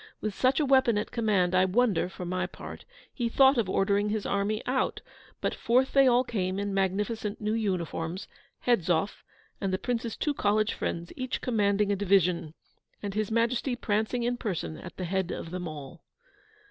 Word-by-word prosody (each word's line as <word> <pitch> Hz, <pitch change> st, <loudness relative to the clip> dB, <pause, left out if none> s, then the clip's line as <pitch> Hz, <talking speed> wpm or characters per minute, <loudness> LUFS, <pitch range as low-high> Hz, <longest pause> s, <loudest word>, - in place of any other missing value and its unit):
With 215 Hz, -1 st, -3 dB
such 260 Hz, +7 st, +2 dB
a 300 Hz, -, +2 dB
weapon 260 Hz, -5 st, +4 dB
at 210 Hz, -, -2 dB
command, 205 Hz, -6 st, +1 dB
I 185 Hz, 0 st, +5 dB
wonder, 190 Hz, -2 st, +2 dB
for 185 Hz, -, -7 dB
my 185 Hz, +1 st, -1 dB
part, -, -, -10 dB, 0.3 s
he 240 Hz, -3 st, -1 dB
thought 265 Hz, +1 st, +5 dB
of 210 Hz, -5 st, 0 dB
ordering 200 Hz, +2 st, +2 dB
his 215 Hz, -1 st, -2 dB
army 200 Hz, +2 st, -1 dB
out; 260 Hz, +1 st, 0 dB, 0.4 s
but -, -, 0 dB
forth 255 Hz, +3 st, +2 dB
they 275 Hz, -1 st, +6 dB
all 250 Hz, 0 st, +5 dB
came, 190 Hz, -6 st, -2 dB
in 200 Hz, 0 st, -2 dB
magnificent 205 Hz, +3 st, -1 dB
new 215 Hz, 0 st, -1 dB
uniforms, 180 Hz, -4 st, -2 dB, 0.4 s
Hedzoff 185 Hz, -5 st, +1 dB, 0.4 s
and 195 Hz, -2 st, 0 dB
the 185 Hz, -, +1 dB
Prince's 235 Hz, 0 st, -3 dB
two 295 Hz, -, 0 dB
college 215 Hz, -3 st, +1 dB
friends 170 Hz, 0 st, -4 dB
each 255 Hz, -1 st, -3 dB
commanding 205 Hz, -3 st, +1 dB
a -, -, +2 dB
division, 180 Hz, -5 st, +2 dB, 0.5 s
and 200 Hz, -1 st, -3 dB
His 215 Hz, 0 st, -1 dB
Majesty 235 Hz, +3 st, +1 dB
prancing 220 Hz, +1 st, -1 dB
in 245 Hz, +1 st, 0 dB
person 170 Hz, -, -3 dB
at 75 Hz, -, -10 dB
the 185 Hz, -, -3 dB
head 190 Hz, 0 st, -1 dB
of 165 Hz, -, -5 dB
them 180 Hz, -1 st, -4 dB
all. 155 Hz, +1 st, -9 dB
205 Hz, 180 wpm, -28 LUFS, 185-235 Hz, 0.5 s, they